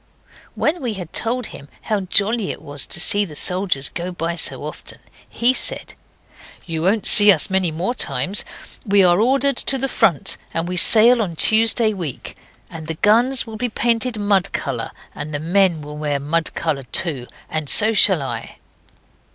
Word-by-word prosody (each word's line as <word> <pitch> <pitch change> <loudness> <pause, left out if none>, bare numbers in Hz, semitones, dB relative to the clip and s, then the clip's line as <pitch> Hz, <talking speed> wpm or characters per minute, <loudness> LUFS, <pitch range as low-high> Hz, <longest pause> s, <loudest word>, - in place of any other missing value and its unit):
When 320 +2 -2
we 240 -4 -4
had 180 -4 -10
told 240 +1 -2
him 140 - -13
how 215 -2 -2
jolly 200 +3 -1
it - - -6
was 145 -2 -5
to - - -2
see 205 +3 +4
the 160 -7 -10
soldiers 180 -4 0
go 175 +1 -7
by 170 -1 -5
so - - +2
often, - - -10 0.3
he 240 +2 +4
said - - -3 0.7
'You 165 -2 -5
won't 195 +5 -1
see 205 -1 +8
us 185 +1 0
many 190 -2 -1
more 170 +9 -4
times. 205 -4 -1 0.4
We're 200 -2 +2
ordered 255 +9 +1
to 270 - 0
the 270 +1 0
front; 210 - 0 0.2
and 165 +1 -3
we 180 - -5
sail 230 +6 +7
on 175 -6 -5
Tuesday 225 +3 +4
week; 170 - -8 0.3
and 160 -2 -11
the 160 - -5
guns 235 +8 +1
will 220 -1 -10
be 245 +2 -4
painted 230 +1 -2
mud 200 -2 -1
colour, 120 -5 -4 0.2
and 150 0 -8
the - - -4
men 170 0 0
will 150 0 -10
wear 145 -2 -3
mud 160 +4 -3
colour 155 -4 -3
too, 140 -9 0 0.2
and 155 -2 -4
so 220 +1 +4
shall 190 -7 +2
I. 135 - -7
190 Hz, 175 wpm, -18 LUFS, 160-225 Hz, 0.7 s, see